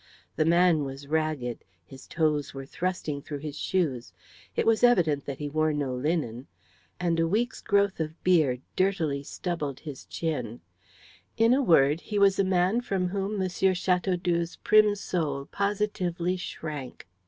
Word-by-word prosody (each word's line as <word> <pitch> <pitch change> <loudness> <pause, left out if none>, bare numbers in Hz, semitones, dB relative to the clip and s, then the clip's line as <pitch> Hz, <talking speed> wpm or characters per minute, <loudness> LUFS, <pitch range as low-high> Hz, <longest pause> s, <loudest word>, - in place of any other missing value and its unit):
The 155 - +2
man 170 -2 +4
was 135 +1 -7
ragged; 150 -5 -2 0.2
his 130 +6 -13
toes 150 -4 0
were 135 0 -6
thrusting 160 -2 -3
through 145 +1 -6
his 145 0 -6
shoes; 150 -8 -1 0.4
it - - +1
was 225 0 +3
evident 165 - +4
that 140 -2 -5
he 150 - -4
wore 155 +1 +1
no 140 -3 -2
linen, 130 -3 -2 0.5
and 170 -2 0
a 165 - +2
week's 230 +7 -1
growth 200 -2 +2
of 160 +1 -5
beard 155 -9 +3
dirtily 165 -7 +1
stubbled 150 -2 -4
his 145 -5 -8
chin, 125 -8 -4 0.8
in 230 +2 +5
a 270 - +3
word, 155 - +4
he 210 - -4
was 200 -1 +4
a - - +5
man 190 +4 +2
from 190 -6 -1
whom 200 +2 -2
M. 190 - +1
Chateaudoux's 180 -2 0
prim 215 -1 +5
soul 155 -8 -2
positively 195 -3 -1
shrank. 150 - -7
165 Hz, 155 wpm, -27 LUFS, 145-190 Hz, 0.8 s, in